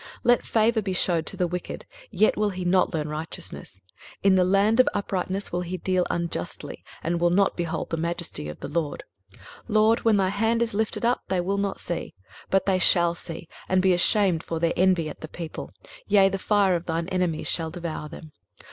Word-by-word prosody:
23:026:010 - - -13
Let 245 -1 +3
favour 225 0 +2
be 190 -2 -3
shewed 170 -3 +1
to - - -2
the 180 - +1
wicked, 180 +1 -5 0.2
yet 215 - +3
will 210 0 +1
he 185 -2 -5
not 185 +1 +3
learn 155 -3 -2
righteousness: 150 -10 -7 0.4
in 195 -1 +5
the 185 -1 +4
land 200 +5 +3
of 255 - +6
uprightness 195 -1 -2
will 175 - -1
he 180 +1 -4
deal 185 -1 0
unjustly, 170 - -4 0.2
and 170 +1 -1
will 175 - +4
not 195 +3 +2
behold 170 -2 -3
the 165 - 0
majesty 170 - -3
of 75 - -9
the - - -4
LORD. 150 0 -2 0.3
23:026:011 - - -19 0.3
LORD, 220 +1 +4
when 225 -2 +3
thy 190 -1 +2
hand 225 +4 +1
is 230 - -3
lifted 220 +2 -1
up, 245 +1 +2
they 185 -1 0
will 195 +3 -1
not 200 -1 -2
see: 175 - -5 0.3
but 195 - +2
they 190 -2 +2
shall 170 -2 +4
see, 165 -1 -7 0.2
and 185 - +3
be 190 -1 +5
ashamed 180 -1 +3
for 165 -1 -4
their 165 0 +1
envy 180 -3 +3
at 150 - -8
the 155 - -6
people; 165 0 -7 0.4
yea, 195 -2 +5
the 195 0 -3
fire 200 -2 +3
of 170 0 -2
thine 165 0 -1
enemies 180 -4 -1
shall 165 -2 0
devour 165 -3 -5
them. 155 0 -11
180 Hz, 210 wpm, -25 LUFS, 170-200 Hz, 0.4 s, of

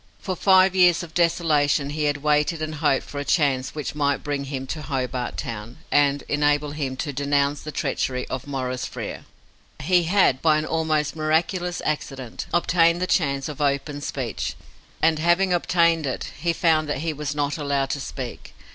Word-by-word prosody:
For 185 - -3
five 190 +1 +5
years 180 -2 +5
of 165 -2 -10
desolation 155 -4 +2
he 150 0 -1
had 145 -1 -1
waited 150 +2 +2
and 155 0 -3
hoped 150 -3 +1
for 145 - -7
a - - -2
chance 140 -3 +1
which 150 -2 -4
might 145 -1 0
bring 145 -1 -2
him 135 -1 -4
to 155 +4 -5
Hobart 130 -3 -3
Town, 115 +2 -6
and 145 -1 +3
enable 145 0 +1
him 140 -3 -3
to 145 +1 -3
denounce 140 +1 +1
the 155 - -6
treachery 130 -3 -2
of 130 +1 -5
Maurice 130 -2 -3
Frere. - - -7 0.5
He 175 +3 +2
had, 175 -7 +3
by 155 -2 +4
an 155 - -1
almost 155 -2 0
miraculous 170 +3 0
accident, 135 -5 -4
obtained 170 0 +3
that 185 - -2
chance 140 -5 +1
of 150 -1 -6
open 145 +1 -1
speech, 130 -5 -3 0.5
and, 160 -1 +4
having 175 +3 +3
obtained 170 -3 +2
it, 130 - -4
he 170 +2 +1
found 160 -2 +2
that 145 -1 -2
he 160 - 0
was 150 -1 -4
not 145 +1 -1
allowed 140 -2 0
to 145 - -2
speak. 130 -3 -7
150 Hz, 180 wpm, -24 LUFS, 140-165 Hz, 0.5 s, five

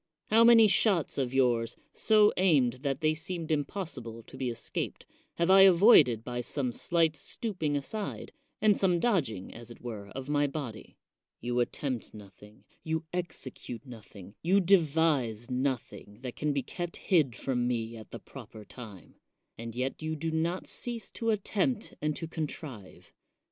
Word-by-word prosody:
How 225 +1 +7
many 230 -2 +8
shots 195 - +2
of 130 -2 -1
yours, 120 -3 +1 0.2
so 215 -1 +4
aimed 135 -10 +3
that 140 0 -2
they 155 0 +3
seemed 165 +1 -4
impossible 140 - -3
to - - -14
be 130 -1 -2
escaped, 115 - -4 0.3
have 170 +2 +2
I 195 0 +8
avoided 170 - +7
by 120 0 -3
some 130 0 -2
slight 165 +5 +1
stooping 165 -4 -3
aside, 200 +9 -4 0.3
and 210 -1 +4
some 180 -3 +2
dodging, 140 - 0
as 120 0 -10
it 120 - -11
were, 110 -5 -7
of 135 0 -6
my 145 0 +2
body? 135 -7 -7 0.4
You 120 +1 -1
attempt 125 -1 -2
nothing, 105 0 -14 0.2
you 160 0 -2
execute 130 -9 -5
nothing, 105 -6 -12
you 185 +4 +3
devise 155 - +2
nothing 125 -5 -3
that 125 -2 -6
can 150 0 -1
be 140 -2 -1
kept 175 +5 -6
hid 155 - +2
from 125 -1 -1
me 115 -2 -2
at 110 -2 -11
the - - -7
proper 110 -1 -12
time; 105 -9 -12 0.4
and 115 0 -7
yet 130 +4 -3
you 155 0 -2
do 160 +2 -3
not 165 +3 -1
cease 235 -4 -5
to 230 - -2
attempt 215 +2 0
and 150 0 0
to 165 - -5
contrive. 150 - -7
145 Hz, 160 wpm, -30 LUFS, 120-175 Hz, 0.4 s, many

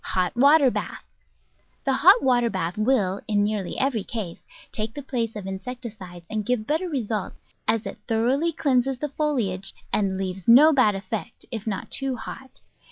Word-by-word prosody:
Hot 185 +2 +1
water 280 +1 +6
Bath - - -5 0.8
The 270 - +1
hot 370 - +6
water 245 -2 +3
bath 175 -4 -2
will, 215 -4 +1
in 205 -1 +2
nearly 205 -3 -2
every 255 -6 0
case, 200 -7 -6 0.3
take 215 +1 -3
the 285 - -6
place 235 -4 -2
of 205 -3 -6
insecticides 195 -3 -7
and 215 +1 -2
give 235 0 -1
better 320 +7 -1
results, 225 - -4
as 225 -1 +1
it - - -6
thoroughly 255 +9 +1
cleanses 270 -3 +1
the 295 +3 -3
foliage 230 -11 -1 0.2
and 195 -2 +1
leaves 190 -1 -4
no 285 +7 +8
bad 235 -7 +4
effects, 200 +4 -6
if 225 -3 -5
not 200 -3 -4
too 270 -1 -1
hot. 260 +3 -9
225 Hz, 165 wpm, -24 LUFS, 200-265 Hz, 0.8 s, no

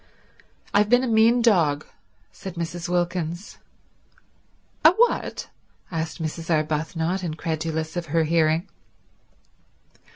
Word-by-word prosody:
"I've 210 +1 +4
been 245 +2 +5
a - - 0
mean 230 +1 +4
dog," 160 -10 +3 0.5
said 185 - -9
Mrs. 170 0 -4
Wilkins. 175 +1 -2 1.2
"A 315 - +8
what?" 470 +5 0 0.4
asked 160 -1 -3
Mrs. 160 +1 -5
Arbuthnot, 160 +3 0
incredulous 160 0 -3
of 175 -2 -3
her 165 +2 +2
hearing. 160 +2 +2
170 Hz, 100 wpm, -24 LUFS, 160-190 Hz, 1.2 s, A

